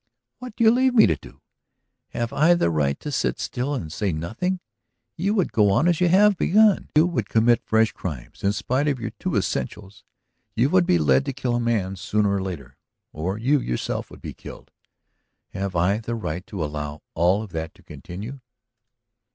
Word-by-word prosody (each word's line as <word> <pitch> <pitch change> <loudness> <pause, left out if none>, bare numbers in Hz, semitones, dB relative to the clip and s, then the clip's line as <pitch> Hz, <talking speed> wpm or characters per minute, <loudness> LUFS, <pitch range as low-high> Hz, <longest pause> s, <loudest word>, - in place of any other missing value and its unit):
"What 250 -3 -9
do - - 0
you 220 - +7
leave 255 +1 +2
me 225 - +8
to 80 - +2
do? - - -16 0.7
Have 120 -1 -3
I 165 +5 +4
the 85 - +1
right 70 -3 0
to 150 - -5
sit 135 - -1
still 130 +4 -2
and 80 - -5
say 100 -2 -1
nothing? 110 - -2 0.6
You 200 +5 0
would 190 -5 +1
go 105 -2 +3
on 100 - +3
as 175 -1 +1
you 180 - +4
have 200 +4 +5
begun; 210 +2 +3
you 155 +2 +6
would 175 -1 -2
commit 115 +1 +3
fresh 110 0 +2
crimes. 70 -10 -7
In 100 - +3
spite 130 +7 -1
of 140 -3 0
your - - -4
'two - - -2
essentials' 100 +9 -3 0.5
you 125 +6 +2
would 185 -2 +4
be 90 - +4
led 70 -5 +3
to 135 - -3
kill 130 -2 -2
a - - +1
man 110 -5 0
sooner 105 +2 0
or 100 - 0
later. 85 -10 -7 0.4
Or 90 +6 -3
you 135 +6 +2
yourself - - -3
would - - -14
be - - -6
killed. - - -12 0.8
Have 95 -1 -4
I 95 +5 +2
the 115 +1 -4
right 90 -4 -5
to 90 -6 -3
allow 75 0 -6
all 90 +6 +2
of 105 - -10
that 80 0 -5
to - - -21
continue?" 110 +10 -8
110 Hz, 200 wpm, -23 LUFS, -, 0.8 s, me